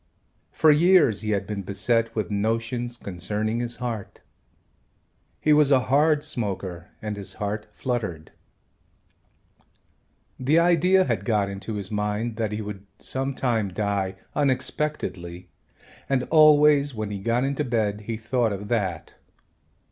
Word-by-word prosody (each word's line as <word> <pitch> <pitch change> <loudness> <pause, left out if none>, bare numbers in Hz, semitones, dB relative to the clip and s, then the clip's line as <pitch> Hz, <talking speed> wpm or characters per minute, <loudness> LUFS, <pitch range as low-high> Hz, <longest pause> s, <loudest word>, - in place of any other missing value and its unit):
For 155 - +5
years 155 - +4
he 110 - -4
had 100 -2 0
been 105 -2 -4
beset 115 +4 0
with 105 -4 -2
notions 115 +3 -1
concerning 105 +4 -2
his 120 0 -3
heart. 115 -5 -5 1.2
He 155 - +3
was 150 -2 +5
a 135 -2 +5
hard 150 +1 +4
smoker 95 -6 -4
and 105 -1 -3
his 100 -1 -5
heart 105 0 -3
fluttered. 105 - -4 2.1
The 140 +5 +2
idea 175 +2 +4
had 115 - -1
got 105 -2 +1
into 100 +3 -6
his 100 -1 -5
mind 105 +2 -2
that 110 -3 -1
he 105 +1 -3
would 100 -1 -8
some 135 +1 -3
time 115 -6 0
die 100 -1 -1 0.2
unexpectedly 130 - -2 0.6
and 135 -2 +2
always 150 -3 +6
when 110 -1 -4
he 100 - -4
got 115 +5 0
into 140 +2 -1
bed 110 -5 -1
he 115 -1 -2
thought 115 0 0
of 100 +1 -5
that. 95 -8 -2
115 Hz, 135 wpm, -25 LUFS, 100-135 Hz, 2.1 s, always